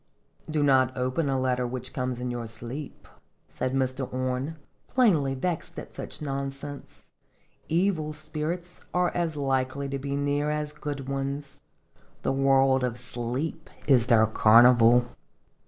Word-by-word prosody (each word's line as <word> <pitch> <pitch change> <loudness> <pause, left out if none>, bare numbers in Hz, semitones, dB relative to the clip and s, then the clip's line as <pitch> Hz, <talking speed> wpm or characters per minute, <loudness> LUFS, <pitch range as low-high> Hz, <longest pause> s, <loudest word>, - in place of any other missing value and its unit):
" - - -24
Do 155 -1 +1
not 130 -2 +3
open 130 +4 0
a 135 -1 +1
letter 125 -1 0
which 130 +1 -5
comes 125 -1 -2
in 125 0 -3
your 120 -1 -4
sleep," 120 +6 -7 0.4
said 130 +1 -2
Mr. 130 0 -1
Orne, 130 +4 -2 0.3
plainly 165 - +3
vexed 170 +5 -3
at - - -8
such - - -8
nonsense; 140 0 -6 0.3
" - - -36 0.3
evil 165 -2 +1
spirits 155 +4 -5
are 180 -1 +2
as 170 -3 -1
likely 135 0 -1
to 140 0 -3
be 140 +1 -3
near 145 +1 0
as 150 0 -2
good 145 -3 -5
ones. 140 +1 -4 0.6
The - - +1
world 135 -1 +3
of 125 -1 -1
sleep 125 +7 -3 0.2
is 125 -5 +4
their 115 -3 +6
carnival." 120 +2 +6
135 Hz, 145 wpm, -27 LUFS, 125-150 Hz, 0.6 s, their